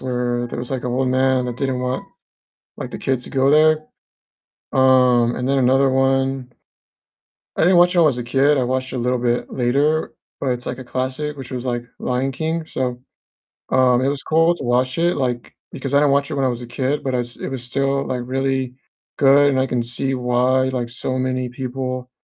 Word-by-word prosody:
where 125 -1 -2
there 120 - -7
was 120 0 -5
like 130 -2 -3
an - - -1
old 130 +1 0
man 130 0 +2
that 120 -1 -4
didn't 130 -2 -2
want, 125 0 -2 0.7
like, - - -5
the - - -5
kids 130 -2 -2
to - - -9
go 135 0 +2
there, 155 0 +4 0.9
um, 125 -2 +4
and 125 +1 -3
then 140 0 +2
another 135 +1 +3
one 135 -1 0 1.1
I - - +1
didn't 175 +2 +5
watch 180 +1 +5
it 175 - +4
when - - +6
I - - +5
was 135 -5 0
a 125 - -3
kid, 135 +4 +2
I 130 - +1
watched 130 +1 -2
it 130 - -4
a - - -2
little 125 +1 0
bit 120 0 -1
later, 140 +5 +1 0.3
but 135 - -2
it's, 125 -1 -2
like, 125 - -4
a 130 - -8
classic, 130 +4 -3
which 135 -2 -9
was, 125 -1 -4
like, 120 -1 -2 0.2
Lion 130 +2 -1
King, 160 +3 -2
so, 125 -4 -3 0.7
um, 125 -1 +3
it 130 - +1
was 140 0 -2
cool 165 +2 +3
to 140 - -8
watch 125 +2 +1
it, 175 +1 +1
like, 125 -3 -2 0.2
because 135 0 -5
I 140 - +6
didn't 145 -1 +3
watch 140 +2 +1
it - - -2
when 135 -1 0
I - - +3
was 120 -1 -3
a 120 - -8
kid, 135 +4 -2
but 130 -2 -2
I 125 - +1
s 120 0 -5
it - - -6
was 135 -2 -5
still, 135 +2 -1
like, 125 -1 -2
really 130 0 -1 0.4
good 140 +1 +5
and 135 -2 +1
I 130 - +1
can 120 -2 -1
see 130 +3 -2
why, 125 +1 +1
like, 125 -2 -3
so 130 +2 -3
many 130 -1 -1
people 130 0 -5
130 Hz, 225 wpm, -20 LUFS, 125-135 Hz, 1.1 s, when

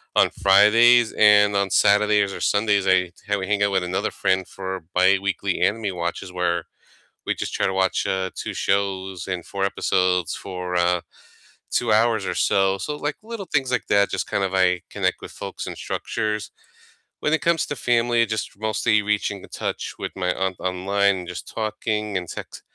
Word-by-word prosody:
on - - +5
Fridays, 115 +4 +5
and 105 -1 +5
on 100 0 +1
Saturdays, 105 -1 +3
or - - -7
Sundays, 100 -2 +2
I 90 -1 +3 0.2
ha 105 0 +1
we 95 - -4
hang 105 0 0
out 100 - +2
with 95 -2 +1
another 90 +4 -2
friend 95 -1 0
for 95 -2 -6
biweekly 95 +1 +2
anime 105 -2 0
watches 85 +2 -4
where 85 -2 -1 0.6
we - - 0
just - - -5
try - - 0
to 95 - -1
watch, 95 0 +1
uh, 95 0 -1
2 - - -5
shows 95 -2 -1
and 90 -2 -4
4 100 -1 -4
episodes 90 -3 +1
for, 90 -2 -5
uh, 90 0 +2 0.7
2 120 -2 +1
hours 110 -1 +3
or - - -2
so, 95 0 +2
so, 150 +8 -4
like, 150 0 -3
little 225 -3 -6
things 135 -3 +1
like 125 - -1
that, 100 0 +3
just - - -2
kind 100 - -1
of 95 - -4
I 90 -2 +2
connect - - -1
with - - -9
folks - - -7
in - - -5
structures. 110 -1 -3 0.7
When 150 - +1
it 160 - +1
comes 170 +1 +2
to 145 - -4
family, 120 0 +2
just 110 -2 -4
mostly 110 0 +1
reaching 105 -1 -1
to - - -11
touch - - -4
with - - -4
my 90 -1 0
aunt 95 -1 -2
online, 100 +2 +1
and 90 -1 -7
just 90 0 -7
talking 105 -1 -2
and 90 -2 -5
text - - -8
100 Hz, 185 wpm, -23 LUFS, 95-105 Hz, 0.7 s, on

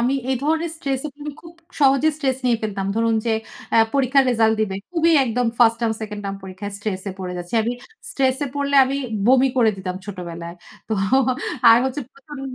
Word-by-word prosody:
আমি 250 +3 +1 0.2
এই 265 - +2
ধরনের 320 +2 0
স্ট্রেসে, 275 -3 -2 0.2
আমি 295 - -4
খুব 335 - -13 0.3
সহজে 275 +2 +4
স্ট্রেস 270 -4 0
নিয়ে 240 -2 +3
ফেলতাম। 200 -3 -3
ধরুন 230 0 +2
যে 230 - +2 0.4
আ - - +5 0.2
পরীক্ষার 275 0 +3
রেজাল্ট 225 -2 +3
দিবে। 195 -3 -1 0.2
খুবই 335 -1 +3
একদম 245 0 0
1st 230 -2 +5
টার্ম, 230 -2 +1
2nd 210 -1 -5
টার্ম 195 0 -3
পরীক্ষায় 190 +2 -7
স্ট্রেস 205 -2 -3
এ - - -7
পড়ে 180 -1 -4
যাচ্ছি। 175 +4 -7
আমি 235 +2 -1 0.4
স্ট্রেসে 265 +1 0
পড়লে 280 0 -1
আমি 270 +1 -2 0.3
বমি 260 +2 +5
করে 230 -3 +4
দিতাম 185 -1 -5
ছোটবেলায়। 170 -3 -7 0.3
তো 220 - -2 0.8
আর 230 - +8
হচ্ছে 265 +2 -2
প্রচন্ড, 275 0 -11
240 Hz, 185 wpm, -21 LUFS, 205-275 Hz, 0.8 s, আর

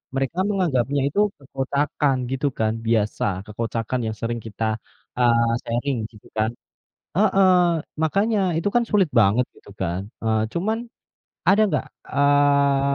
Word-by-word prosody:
mereka 135 +7 -1
menganggapnya 145 - +1
itu 150 - -1 0.2
kekocakan 140 +1 -1
gitu 135 +2 0
kan. 110 -3 0
Biasa, 105 -3 0
kekocakan 115 +3 -3
yang 110 - -3
sering 120 0 -3
kita, 110 0 -2 0.4
eee, 115 -1 +4
sharing 125 +3 -1
gitu 105 -3 -17
kan. 110 +1 +1 0.6
Heeh, 195 -1 +4 0.5
makanya 200 +8 +2 0.2
itu 170 +5 0
kan 240 - +4
sulit 205 -3 +4
banget 115 +1 +4
gitu - - -18
kan. 95 +2 -3
Eee, 110 -1 +1
cuman 220 +7 -2 0.6
ada 205 +2 +6
gak, - - 0 0.2
eee, 140 -1 +3
135 Hz, 130 wpm, -23 LUFS, 115-160 Hz, 0.6 s, ada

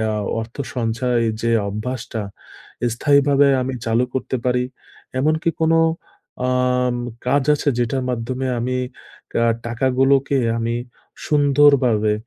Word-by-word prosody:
আ - - -2 0.2
অর্থ 115 +1 -7 0.2
সঞ্চয় 120 0 0 0.2
যে 115 - -1 0.2
অভ্যাসটা 110 +3 -4 0.7
স্থায়ীভাবে 140 +2 +4
আমি 130 +1 -2
চালু 115 +2 +2
করতে 130 0 -2
পারি। 125 0 +2 0.6
এমনকি 155 +4 +1
কোনো 160 +1 +4 0.7
আম 125 -1 +1 0.3
কাজ 135 +2 +2
আছে 145 0 0
যেটার 125 +2 0
মাধ্যমে 125 +2 -3
আমি 125 +2 -2 0.6
কা - - +1 0.3
টাকাগুলোকে 135 +3 +2 0.2
আমি 115 0 -1 0.5
সুন্দরভাবে 140 -7 +4
125 Hz, 110 wpm, -20 LUFS, 120-140 Hz, 0.7 s, স্থায়ীভাবে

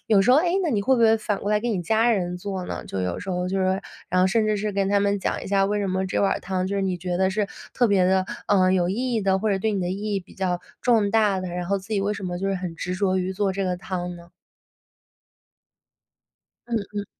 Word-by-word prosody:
有 210 -3 +5
时 215 - +3
候， 255 - +7
诶， 345 +2 +1
那 340 - 0
你 210 -6 +1
会 265 +6 +3
不 245 - 0
会 225 0 +6
反 210 -2 -2
过 205 - -2
来 210 - +3
给 240 +2 -1
你 200 -5 -1
家 225 +6 +3
人 180 -5 0
做 190 0 -4
呢， - - -5
就 95 - -3
有 90 -1 -2
时 195 - -5
候， 180 0 -1
就 195 +1 -1
是 190 - +1
说， 190 +1 +1 0.3
然 180 - +3
后 185 - +5
甚 215 +3 +2
至 215 -1 +1
是 210 +1 -2
跟 195 0 0
他 200 0 +3
们 200 0 +1
讲 - - -2
一 - - -6
下， 195 0 +2
为 205 +1 0
什 200 - -1
么 190 0 -1
这 - - -1
碗 195 - +3
儿 - - -3
汤， 185 0 -2
就 200 +1 -2
是 195 - 0
你 190 -2 0
觉 180 0 -2
得 190 +1 +2
是 205 +1 0 0.3
特 245 - +3
别 195 -3 +4
地， 190 0 +3 0.2
呃， 185 -2 +4
有 180 -2 +2
意 245 +5 -1
义 225 - +1
呢， 190 -1 +2
或 215 +2 0
者 195 - +1
对 220 +3 0
你 200 - -1
的 175 - -1
意 205 +2 -3
义 195 - 0
比 180 - -18
较 180 -2 -1 0.2
重 225 -5 +3
大 210 -3 +3
的？ 185 - -4
然 175 0 -4
后， 200 +2 +1
自 190 +3 -14
己 205 - +1
为 200 +2 0
什 200 - -7
么 180 -1 -3
就 195 - -2
是 195 - 0
很 180 -2 -4
执 180 +3 -3
着 190 -1 +1
于 185 0 -1
做 195 0 0
这 195 +1 -2
个 180 -1 -1
汤 180 -1 -4
呢？ 170 0 -14 2.4
嗯， 235 - -1 0.2
嗯。 205 -1 -3
195 Hz, 310 characters per minute, -24 LUFS, 185-210 Hz, 2.4 s, 候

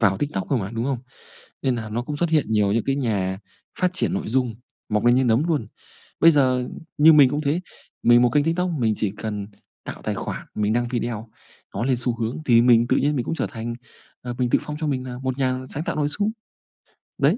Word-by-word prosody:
vào 100 -4 +3
TikTok 105 -5 -3
cơ 140 - +3
mà, 100 -4 -3
đúng 115 0 -3
không? 135 -1 -1 0.6
Nên 130 -3 +1
là 110 -2 -5
nó 115 +3 -2
cũng 145 +4 -5
xuất 170 +2 0
hiện 155 -2 +3
nhiều 105 -2 +3
những 115 0 +1
cái 135 - +1
nhà 100 -8 -1 0.4
phát 180 -1 +2
triển 185 - -1
nội 195 - -3
dung, 125 -1 0 0.3
mọc 105 0 0
lên 120 +1 +5
như 130 - +3
nấm 120 +4 +3
luôn. 150 -9 0 0.5
Bây 165 - +7
giờ 130 -4 +2 0.3
như 160 +2 +8
mình 145 -4 +7
cũng 145 +3 -1
thế, 155 +4 0 0.4
mình 120 0 +6
1 125 - +4
kênh 145 +4 +2
TikTok, 175 +3 0
mình 110 -3 +2
chỉ 105 -2 -1
cần 105 -2 -4 0.4
tạo - - -7
tài - - -2
khoản, - - -5
mình 105 0 +1
đăng 120 +1 +1
video, 120 -2 -3 0.5
nó 100 - -1
lên 130 -1 +2
xu 125 -1 -1
hướng 115 +2 -2
thì 115 -3 +6
mình 120 -1 +5
tự - - +2
nhiên 145 +1 +1
mình 125 -4 -1
cũng - - -2
trở - - -1
thành, 115 0 -5 0.5
à, 125 - -5
mình 125 -1 0
tự - - +3
phong 150 - -6
cho 155 - -1
mình 130 -3 -2
là 125 -1 -6
một 130 0 -3
nhà 130 -1 -1
sáng 150 - -3
tạo - - -3
nội 150 -1 +1
dung, 205 +8 -1 0.9
đấy. - - +3
125 Hz, 240 wpm, -23 LUFS, 115-145 Hz, 0.9 s, như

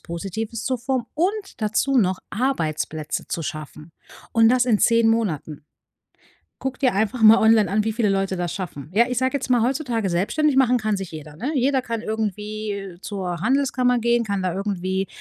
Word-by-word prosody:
Positives 205 +6 -5
zu 255 - 0
formen 250 0 -2
und 390 +5 -1
dazu 225 +6 +1
noch 185 -5 +2
Arbeitsplätze 155 - -2
zu 165 - -3
schaffen. 155 0 -7 0.4
Und 225 0 +5
das 250 0 +3
in 225 -4 +3
10 230 +1 +4
Monaten. 165 -10 -1 1.0
Guck 265 -1 -4
dir 255 -2 +2
einfach 220 +4 -1
mal 220 +1 +8
online 220 -2 +4
an, 210 +1 +1
wie 220 - -1
viele 220 -1 0
Leute 195 -1 0
das 175 -1 -2
schaffen. 150 -7 -6
Ja, 230 +4 +5
ich 250 - -2
sage 260 +1 +1
jetzt 265 -1 -3
mal, 245 -2 +4
heutzutage 245 -6 -1
selbstständig 265 - +1
machen 250 -2 +4
kann 215 -3 -1
sich 195 -3 -6
jeder, 150 -1 -9
ne? 250 - -3
Jeder 265 0 +2
kann 230 -2 -4
irgendwie 210 -3 -4
zur 185 -5 -4
Handelskammer 250 0 +2
gehen, 235 0 +2
kann 200 -2 -2
da 185 -2 -1
irgendwie 190 -1 -2
220 Hz, 180 wpm, -22 LUFS, 190-250 Hz, 1.0 s, mal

